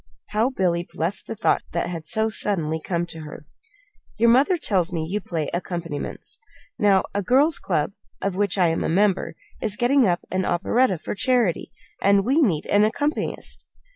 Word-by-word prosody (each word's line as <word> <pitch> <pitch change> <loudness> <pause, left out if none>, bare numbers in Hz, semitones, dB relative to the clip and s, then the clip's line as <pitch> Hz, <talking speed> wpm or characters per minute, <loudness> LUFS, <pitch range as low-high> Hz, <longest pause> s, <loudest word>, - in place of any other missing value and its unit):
(How 220 +4 +1
Billy 175 -8 -1
blessed 170 +5 -2
the 225 - -4
thought 215 - +2
that 170 - 0
had 165 -3 -6
so 220 0 +2
suddenly 165 -8 -1
come 175 -2 -1
to 165 - -9
her!) 150 -1 -9 0.7
"Your 230 +1 +4
mother 285 +9 +4
tells 185 - +1
me 165 -3 -2
you 205 +5 -2
play 165 -5 -3
accompaniments. 170 -4 -4 0.4
Now 200 -2 +4
a 205 - 0
girls' 275 - +3
club, 160 -1 -1 0.3
of 195 -2 -2
which 200 0 0
I 180 -3 +4
am 165 - -1
a - - -1
member, 190 -2 +1 0.3
is 210 -2 -1
getting 250 0 +4
up 175 -1 +1
an 185 0 0
operetta 190 +4 +1
for - - -5
charity, 230 -3 +1 0.3
and 200 0 +4
we 275 +6 +3
need 175 - +1
an 205 +1 +3
accompanist. 290 +8 -2
195 Hz, 175 wpm, -23 LUFS, 170-220 Hz, 0.7 s, Your